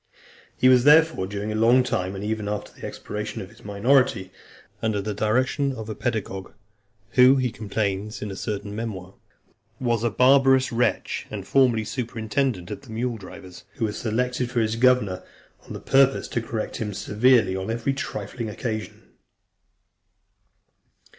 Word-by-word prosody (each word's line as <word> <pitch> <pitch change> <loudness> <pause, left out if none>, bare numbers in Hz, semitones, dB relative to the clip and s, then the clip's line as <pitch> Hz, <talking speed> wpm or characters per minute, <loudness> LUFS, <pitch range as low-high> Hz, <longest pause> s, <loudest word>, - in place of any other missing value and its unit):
He 130 - +4
was, 125 -1 +6
therefore, 150 -8 +5
during 100 +2 -4
a - - -3
long 120 +4 +5
time, 95 -6 -2
and 95 - -6
even 105 0 -2
after 105 0 -4
the - - -8
expiration 105 0 -6
of 95 - -7
his 115 - -19
minority, 105 -2 +2 0.5
under 110 -2 0
the 105 +1 -3
direction 130 +6 0
of 110 -4 -7
a - - -3
pedagogue, 105 -5 -4 0.6
who, 130 +1 +6
he 130 -3 0
complains 105 -1 -3
in 105 - -5
a - - -6
certain 100 0 -4
memoir, 100 -5 -5 0.7
"was 120 -3 0
a 120 - +2
barbarous 135 +3 +4
wretch, 120 +1 -1
and - - -6
formerly 125 -5 +3
superintendent 115 -4 -2
of - - -6
the 135 - -17
mule 115 +1 -2
drivers, 95 -1 -11
who 115 - -1
was 105 -1 -3
selected 125 +3 -1
for 120 -1 -1
his 110 0 0
governor, 115 -6 +2 0.5
on - - -6
purpose 135 0 +3
to 115 - -1
correct 115 -1 -4
him 105 -3 -4
severely 110 -3 +3
on 95 +2 -4
every 120 +4 -1
trifling 125 -4 -5
occasion." 110 0 -5
110 Hz, 155 wpm, -24 LUFS, 105-125 Hz, 0.7 s, was